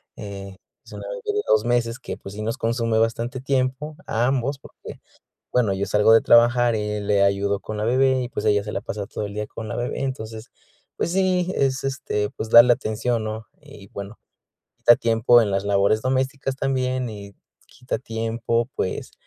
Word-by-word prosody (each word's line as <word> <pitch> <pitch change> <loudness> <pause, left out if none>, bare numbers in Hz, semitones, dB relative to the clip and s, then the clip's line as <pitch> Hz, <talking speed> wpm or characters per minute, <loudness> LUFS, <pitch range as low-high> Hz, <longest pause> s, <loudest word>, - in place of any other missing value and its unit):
eh, 100 -1 -8 0.3
es - - -15
una - - -7
bebé - - -6 0.2
de - - +2
2 110 +1 +3
meses 120 -1 0
que, - - -6
pues, 100 - -10
sí 105 - -5
nos 115 +2 -2
consume 115 -1 0
bastante 115 +2 -1
tiempo, 135 +3 -1
a 115 +2 +1
ambos, 135 +1 0
porque, - - -12 0.5
bueno, 115 -6 +2
yo 95 +1 -2
salgo 105 +2 +4
de 115 - +6
trabajar 120 0 +4
y 105 -1 -2
le 100 -1 +2
ayudo 100 0 +1
con 110 - -7
la 105 - -2
bebé 130 +2 +3
y, 125 - -4
pues, 110 - -4
ella 105 -1 +3
se 105 - -6
la 100 - -2
pasa 100 -1 -5
todo 105 - -5
el 100 - -7
día 105 0 -4
con 110 - -8
la - - -5
bebé. 120 +2 -3
Entonces, 110 -3 -5 0.5
pues, 170 - -1
sí, 185 -1 +1
es 135 0 0
este, 130 -6 -2
pues, 110 - -6
darle 120 +1 +8
atención, 115 +1 -2
¿no? 110 +1 -5
Y 140 -9 -14
bueno, 100 +3 -8 0.6
quita 120 - +6
tiempo 115 +1 +4
en 105 - -1
las 100 +1 0
labores 100 +2 +2
domésticas 135 +1 -1
también, 130 -2 -1
y 100 -2 -10 0.3
quita 125 +2 -5
tiempo, 115 +1 -2
pues, 95 - -3
115 Hz, 195 wpm, -23 LUFS, 105-130 Hz, 0.6 s, darle